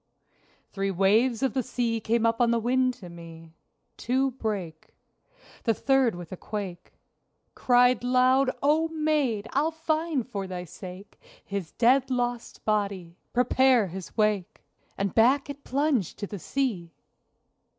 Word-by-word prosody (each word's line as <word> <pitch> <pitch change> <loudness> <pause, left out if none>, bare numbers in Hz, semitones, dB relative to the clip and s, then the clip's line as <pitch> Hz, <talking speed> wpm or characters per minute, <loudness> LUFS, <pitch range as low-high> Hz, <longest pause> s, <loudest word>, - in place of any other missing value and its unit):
Three 195 0 -2
waves 215 +6 +2
of 270 - +1
the 260 - +1
sea 230 -1 -1
came 225 +1 0
up 230 +1 +1
on 240 - +4
the 235 - +2
wind 255 +2 +1
to 185 - -11
me. 165 -1 -12 0.4
Two 265 +2 0
brake. 200 -10 -5 0.7
The 225 -2 +2
third 265 -4 +2
with 175 -2 -9
a 185 - -6
quake 195 -5 -6 0.6
Cried 245 -1 +3
loud, 255 +2 +3
"O 310 +3 +3
maid, 300 -9 0
I'll 295 +4 +2
find 320 -4 -1
for 200 -6 -4
thy 180 -1 -5
sake 185 +3 -11 0.2
His 195 -5 -5
dead 255 +3 +3
lost 245 -2 -3
body: 200 -5 -2
prepare 250 -3 +3
his 185 +4 -9
wake!" 210 -4 0 0.3
(And 195 -1 -1
back 265 +5 +3
it 285 0 -12
plunged 275 - 0
to - - -4
the 205 0 -7
sea!) 200 -9 -2
230 Hz, 140 wpm, -27 LUFS, 195-260 Hz, 0.7 s, on